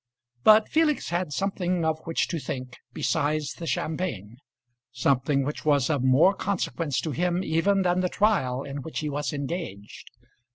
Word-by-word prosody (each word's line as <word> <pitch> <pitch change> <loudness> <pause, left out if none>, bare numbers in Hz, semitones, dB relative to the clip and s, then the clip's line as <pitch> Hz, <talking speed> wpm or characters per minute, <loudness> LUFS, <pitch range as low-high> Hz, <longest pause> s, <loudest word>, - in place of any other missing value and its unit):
But 215 0 +7
Felix 310 -2 +1
had 175 -2 -1
something 180 -1 -1
of 160 0 0
which 165 - 0
to 170 - -2
think 130 -3 -6
besides 150 +3 -1
the 170 - -7
champagne 130 - -3 0.5
something 135 +2 +1
which 145 +3 -4
was 145 -1 +2
of 145 -4 0
more 130 +9 +5
consequence 165 -8 -2
to 160 - -3
him 175 +6 0
even 190 +4 +2
than 180 0 +2
the 180 0 +1
trial 155 -13 +1
in 140 0 -6
which 160 +3 -5
he 150 -1 -3
was 145 +1 -2
engaged. 140 - -6
155 Hz, 160 wpm, -26 LUFS, 140-180 Hz, 0.5 s, But